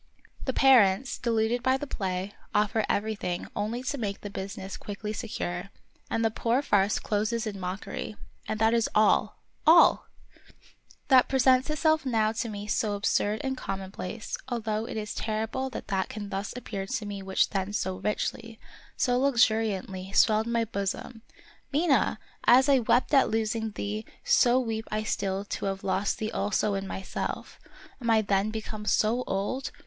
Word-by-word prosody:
The 260 - +1
parents, 245 -3 +4
deluded 230 0 +1
by 260 +1 +2
the 290 - -5
play, 190 -5 -3 0.2
offer 210 +1 +2
everything 200 -4 -2
only 225 +4 -2
to 280 +2 -3
make 200 -3 -3
the 205 - -7
business 195 0 -6
quickly 210 +1 -6
secure; 195 -5 -4 0.4
and 225 - 0
the 225 - +2
poor 240 +5 0
farce 205 -4 +2
closes 215 +2 -1
in 205 -2 -5
mockery. 190 +3 -5 0.3
And 215 - -2
that 225 +1 +4
is 230 -1 +2
all, 215 0 +3 0.3
all! 335 +2 +6 1.0
That 260 -2 +6
presents 260 +1 +4
itself 315 +1 +2
now 225 -5 +1
to 225 +1 -3
me 205 -1 -6
so 210 0 0
absurd 205 +1 0
and 265 -1 -1
commonplace, 195 -1 -5
although 220 -3 -2
it - - -5
is 210 -1 -4
terrible 225 +4 -2
that 255 - -8
that 190 -2 0
can 205 -2 -6
thus 200 +1 -3
appear 195 -5 -5
to 210 - -3
me 200 -1 -5
which 190 0 +1
then 195 -1 -2
so 190 -3 -2
richly, 225 +2 -3 0.4
so 245 -1 +2
luxuriantly, 220 -7 +1
swelled 220 +1 +4
my 235 -1 +1
bosom. 205 +2 -4 0.5
Mina! 300 0 +2 0.3
as 260 +3 +6
I 275 -2 +5
wept 245 +4 +2
at 275 - +5
losing 220 0 -1
thee, 210 +2 -4 0.2
so 245 +1 +4
weep 225 -3 -3
I 215 0 -1
still 195 -2 -2
to - - -4
have 195 0 -3
lost 195 +1 0
thee 215 0 -3
also 205 0 0
in 195 0 -3
myself. 190 0 -5 0.4
Am 235 - -2
I 220 -1 +4
then 200 +1 +1
become 215 -1 -6
so 230 +4 +2
old? 205 +8 -2
215 Hz, 165 wpm, -28 LUFS, 200-240 Hz, 1.0 s, all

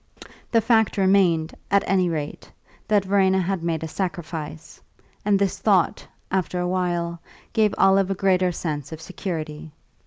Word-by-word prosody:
The 230 - +4
fact 220 -1 +2
remained, 185 -5 +3 0.2
at 200 0 +3
any 185 -2 +2
rate, 155 -3 -5 0.4
that 205 -2 +2
Verena 190 -1 +3
had 190 0 -1
made 165 -1 -2
a - - -3
sacrifice; 160 -3 -5 0.4
and 205 -1 +3
this 195 -1 0
thought, 195 -5 +2 0.2
after 185 -1 -1
a 180 - -1
while, 175 -2 -1 0.3
gave 215 -2 +2
Olive 195 0 +4
a 195 - 0
greater 185 -2 +2
sense 150 -4 -4
of 160 - -7
security. 160 -3 -6
180 Hz, 150 wpm, -23 LUFS, 165-195 Hz, 0.4 s, The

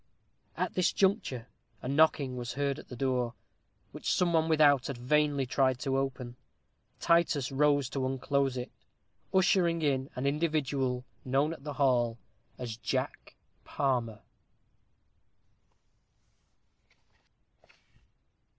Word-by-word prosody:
At - - -1
this 180 -2 +2
juncture, 190 - 0 0.4
a - - -4
knocking 140 -2 +3
was 120 -1 -5
heard 140 -1 -1
at - - -12
the 125 - -8
door, 125 -2 -1 0.6
which - - -3
some 175 -1 +2
one 160 0 +2
without 145 -4 +4
had 140 -4 -5
vainly 145 +2 +1
tried 130 0 +1
to 135 -2 -1
open. 130 -2 -3 0.6
Titus 165 -5 +2
rose 145 -1 +2
to 135 0 -3
unclose 135 0 0
it, 125 - -5 0.6
ushering 180 -3 +3
in 135 -2 0
an 125 - -3
individual 140 -4 0 0.2
known 135 +5 +1
at 140 - -12
the 145 -1 -5
hall 125 -4 +2 0.4
as 120 -3 -5
Jack 115 - -3 0.3
Palmer. 120 -6 -1
135 Hz, 115 wpm, -30 LUFS, 125-150 Hz, 0.6 s, without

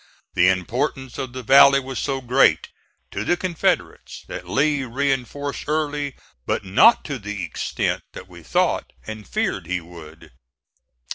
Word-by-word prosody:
The 90 +1 +4
importance 120 +7 -2
of 130 -2 -4
the 130 0 -6
valley 140 +3 +7
was 130 -3 -5
so 135 -2 -2
great 125 +2 +3 0.4
to - - -3
the 175 - +1
Confederates 175 -3 -2
that - - -7
Lee 145 0 +1
reinforced 140 +2 -2
Early, 150 -2 -1 0.3
but - - -1
not 135 - +5
to 140 -4 -4
the 105 -2 -5
extent 80 - -2
that - - -10
we - - -13
thought - - 0
and 110 -2 -8
feared 90 -4 -2
he 90 0 -1
would. 80 -3 -13
130 Hz, 145 wpm, -22 LUFS, 100-140 Hz, 0.4 s, valley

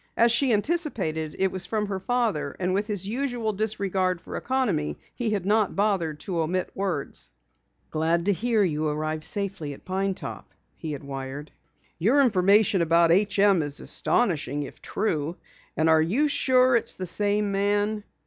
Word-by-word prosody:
As 235 0 +5
she 245 +3 +3
anticipated, 210 - 0
it 190 0 +1
was 185 -1 -2
from 215 -1 -1
her 195 -2 -3
father, 190 - -1
and 185 0 0
with 205 +2 0
his 200 -3 -2
usual 240 -2 -2
disregard 195 -3 -1
for 170 - -9
economy 220 - -1 0.2
he 240 -2 -2
had 200 -4 -1
not 210 0 +2
bothered 190 -7 0
to 180 -3 -3
omit 175 +3 -1
words. 190 -7 -3 0.6
"Glad 165 +2 0
to 205 - +3
learn 225 -5 +2
you 155 -1 -1
arrived 155 +1 -2
safely 195 -8 -3
at - - -20
Pine 190 +1 -1
Top," - - -9 0.2
he 155 -2 -5
had 145 - -7
wired. 135 +2 -6 0.5
"Your 230 - +3
information 205 -3 +4
about 170 0 +4
H. 200 +3 +2
M. 200 -3 +5
is 145 -1 -1
astonishing, 145 - 0
if 140 - -11
true. 165 -6 -2 0.4
Are 160 0 +4
you 225 - +2
sure 255 -3 +3
it 235 - +2
is - - -3
the 185 - -5
same 205 +3 +1
man? 205 +1 0
195 Hz, 170 wpm, -25 LUFS, 160-215 Hz, 0.6 s, As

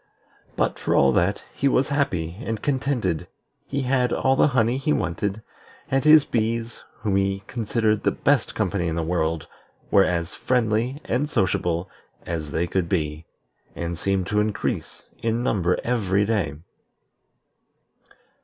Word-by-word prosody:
But, - - 0
for - - 0
all 70 -1 +5
that, 90 +9 +1
he 140 - 0
was 130 -1 +2
happy 90 - -1
and 115 -4 -3
contented; 125 - -1 0.4
he 140 0 -2
had 125 -1 +1
all 135 0 +2
the - - +5
honey 125 -2 +2
he 145 +3 0
wanted, 100 - -1 0.5
and 135 0 +2
his 155 -1 +7
bees, 115 +1 -2 0.2
whom 100 -3 +1
he 95 0 0
considered 110 -2 0
the - - +2
best 145 -1 +1
company 95 -4 0
in 80 - -1
the 85 - -1
world, 80 -1 -1 0.5
were 100 - +6
as 85 0 -1
friendly 120 +2 0
and 145 +3 0
sociable 90 - 0 0.4
as 80 -3 -3
they 80 +4 0
could 85 -1 -1
be, 75 -3 -2 0.5
and 85 0 -3
seemed 95 +2 0
to 105 +2 0
increase 105 -1 -2 0.2
in 115 +1 0
number 90 -7 +1
every 100 -5 +1
day. 105 -6 0
105 Hz, 145 wpm, -24 LUFS, 85-125 Hz, 0.5 s, his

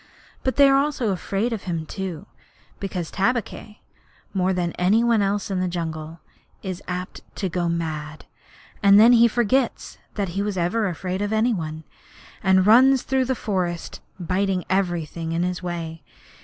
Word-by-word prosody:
But 260 - -1
they 280 -1 +7
are 275 0 +4
afraid 225 -4 -1
of 220 - -5
him 165 -3 -3
too, 190 0 -6 0.5
because 185 -4 -4
Tabaqui, 215 0 -2 0.5
more 190 -1 +1
than 180 -2 -1
any 195 +7 +2
one 230 -3 +3
else 200 0 -1
in 190 - 0
the 185 - 0
jungle, 165 -2 -5 0.4
is 185 -1 -5
apt 180 +1 -5
to 190 - -2
go 175 0 -1
mad, 155 -2 -4 0.6
and 200 -1 +7
then 230 +3 +8
he 235 0 +7
forgets 240 +2 0 0.2
that 200 -4 -2
he 195 +4 -2
was 205 -1 -2
ever 195 +5 +1
afraid 185 +2 -3
of 205 0 -1
any 220 +2 +2
one, 160 -4 -5 0.6
and 190 -1 +4
runs 255 +5 +6
through 265 -1 +1
the 260 +1 0
forest 180 -6 -3 0.2
biting 185 0 -1
everything 170 -3 -1
in 170 +1 0
his 180 0 -2
way. 165 -2 -5
190 Hz, 160 wpm, -23 LUFS, 175-215 Hz, 0.6 s, then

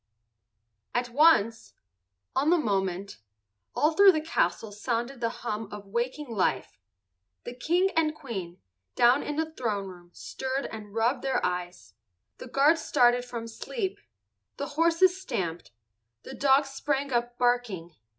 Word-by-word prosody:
At 245 0 0
once—on 220 - +1
the 350 - +5
moment—all 175 - -3
through 395 +3 +7
the 310 - 0
castle 315 - -1
sounded 235 +4 -3
the 230 - +1 0.2
hum 215 -2 -3
of 205 -1 -8
waking 245 +8 -3
life. 180 - -1 0.6
The - - -6
King 350 +10 +1
and 310 -1 +2
Queen, 195 - -6 0.4
down 245 +4 +5
in 295 - -4
the 320 +1 -2
throne 215 -9 -2
room 175 -2 -12
stirred 265 +8 -4
and 210 -1 -9
rubbed 230 +4 +1
their 265 -1 0
eyes. 180 0 -4 0.5
The - - -8
guards 290 +6 +3
started 245 0 +3
from 235 -2 -6
sleep. 385 - -4 0.6
The 280 - -4
horses 335 +5 +3
stamped, 175 - -4 0.5
the - - -9
dogs 275 0 +3
sprang 275 0 -2
up 240 0 -1
barking. 235 -9 0
240 Hz, 130 wpm, -27 LUFS, 195-290 Hz, 0.6 s, through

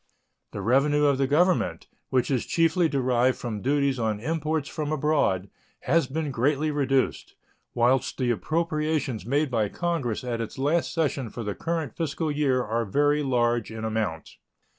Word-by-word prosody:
The 100 - -6
revenue 145 +6 +3
of 140 -2 +2
the 135 - +2
Government, 150 - +2 0.2
which 130 +1 +1
is 130 -3 0
chiefly 165 0 +2
derived 130 -2 +2
from 110 -4 -5
duties 140 0 +1
on 110 -2 -1
imports 155 +2 -1
from 155 -2 -4
abroad, 145 - +1 0.3
has 165 -5 +2
been 150 +2 -3
greatly 145 +5 +1
reduced, 135 -2 0 0.4
whilst 125 +2 +2
the 125 -2 +1
appropriations 155 -3 -1
made 145 +2 +1
by 110 -4 +1
Congress 165 - -2
at 120 -2 -2
its 115 - -6
last 150 +5 +1
session 145 -7 -1
for 115 - -6
the 105 -1 -3
current 165 -1 -3
fiscal 160 -1 -2
year 140 -4 +1
are 115 +1 -1
very 145 +7 +2
large 120 -4 +1
in 110 0 -5
amount. 110 -8 -3
135 Hz, 160 wpm, -26 LUFS, 120-155 Hz, 0.4 s, revenue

